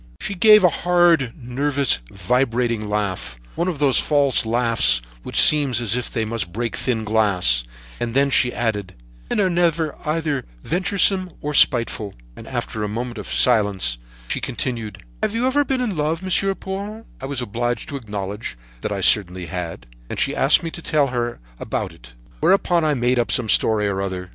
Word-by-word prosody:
"She -, -, -3 dB
gave 210 Hz, +2 st, +6 dB
a 180 Hz, -, +7 dB
hard, 175 Hz, -7 st, +3 dB
nervous, 135 Hz, -, 0 dB
vibrating 115 Hz, +1 st, 0 dB
laugh; 95 Hz, -13 st, -3 dB
one 170 Hz, -, -1 dB
of 175 Hz, -5 st, -2 dB
those 140 Hz, -3 st, +3 dB
false 140 Hz, -6 st, +2 dB
laughs 115 Hz, -, +2 dB, 0.2 s
which -, -, -2 dB
seem 150 Hz, -2 st, +6 dB
as 120 Hz, -3 st, +1 dB
if 125 Hz, -, -3 dB
they 110 Hz, -1 st, -2 dB
must 110 Hz, -5 st, -3 dB
break 115 Hz, +3 st, -3 dB
thin 115 Hz, -4 st, -1 dB
glass, 100 Hz, -, +2 dB, 0.4 s
and 120 Hz, 0 st, -3 dB
then 140 Hz, 0 st, +3 dB
she 125 Hz, -2 st, +3 dB
added: 105 Hz, -6 st, -2 dB, 0.3 s
'Men -, -, 0 dB
are 195 Hz, -, +3 dB
never 170 Hz, -3 st, +1 dB
either 150 Hz, -3 st, -1 dB, 0.2 s
venturesome 185 Hz, +1 st, +1 dB
or 150 Hz, 0 st, -4 dB
spiteful.' 115 Hz, -7 st, +2 dB, 0.2 s
And, -, -, -11 dB
after 105 Hz, -, -4 dB
a -, -, -1 dB
moment's 115 Hz, 0 st, -5 dB
silence, 100 Hz, -, +2 dB, 0.3 s
she -, -, -2 dB
continued: 115 Hz, -6 st, -4 dB, 0.2 s
'Have 215 Hz, -, -1 dB
you 235 Hz, +2 st, 0 dB
ever 275 Hz, +3 st, +2 dB
been 265 Hz, -2 st, -1 dB
in 225 Hz, -6 st, -2 dB
love, 155 Hz, +3 st, -1 dB
Monsieur 195 Hz, +1 st, +1 dB
Paul?' 200 Hz, +4 st, -6 dB, 0.2 s
I 135 Hz, -, -4 dB
was 140 Hz, -2 st, -3 dB
obliged 120 Hz, +1 st, -2 dB
to 145 Hz, -, -5 dB
acknowledge 105 Hz, -, -5 dB, 0.2 s
that -, -, -3 dB
I -, -, -2 dB
certainly 90 Hz, -3 st, +3 dB
had, 90 Hz, -2 st, -6 dB, 0.2 s
and -, -, -4 dB
she -, -, +1 dB
asked -, -, +4 dB
me 165 Hz, -, -4 dB
to 170 Hz, -, -9 dB
tell 150 Hz, -4 st, +1 dB
her 120 Hz, -1 st, -2 dB
all -, -, -20 dB, 0.2 s
about -, -, -3 dB
it. -, -, -16 dB, 0.3 s
Whereupon 175 Hz, -, +3 dB
I 150 Hz, -2 st, +2 dB
made 125 Hz, 0 st, +1 dB
up 120 Hz, -, 0 dB
some 120 Hz, -3 st, +1 dB
story 105 Hz, +2 st, +3 dB
or 95 Hz, -1 st, -2 dB
other. 95 Hz, -2 st, -4 dB
125 Hz, 180 wpm, -21 LUFS, 105-160 Hz, 0.4 s, a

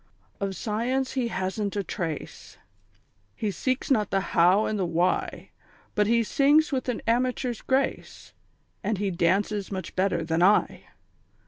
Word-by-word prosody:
_ -, -, +1 dB
_"Of 195 Hz, -1 st, -4 dB
Science 240 Hz, +7 st, -1 dB
he 255 Hz, -3 st, -1 dB
hasn't 200 Hz, 0 st, -3 dB
a 200 Hz, -, -1 dB
trace, 165 Hz, -4 st, -6 dB, 0.8 s
He 210 Hz, -, -2 dB
seeks 255 Hz, -, -2 dB
not 215 Hz, -6 st, +2 dB
the 195 Hz, -, +1 dB
How 180 Hz, +5 st, +5 dB
and 215 Hz, -, -2 dB
the -, -, +1 dB
Why, 170 Hz, +2 st, -1 dB, 0.4 s
But 210 Hz, -1 st, +2 dB
he 230 Hz, +1 st, +3 dB
sings 290 Hz, +7 st, +3 dB
with 260 Hz, -2 st, -2 dB
an 240 Hz, -, -3 dB
amateur's 245 Hz, +1 st, 0 dB
grace 265 Hz, +1 st, -2 dB, 0.5 s
And 210 Hz, 0 st, -1 dB
he 200 Hz, 0 st, -1 dB
dances 195 Hz, +4 st, 0 dB
much 190 Hz, -1 st, -5 dB
better 185 Hz, -3 st, +1 dB
than 165 Hz, +1 st, 0 dB
I. 200 Hz, +4 st, +3 dB
210 Hz, 150 wpm, -26 LUFS, 185-245 Hz, 0.8 s, How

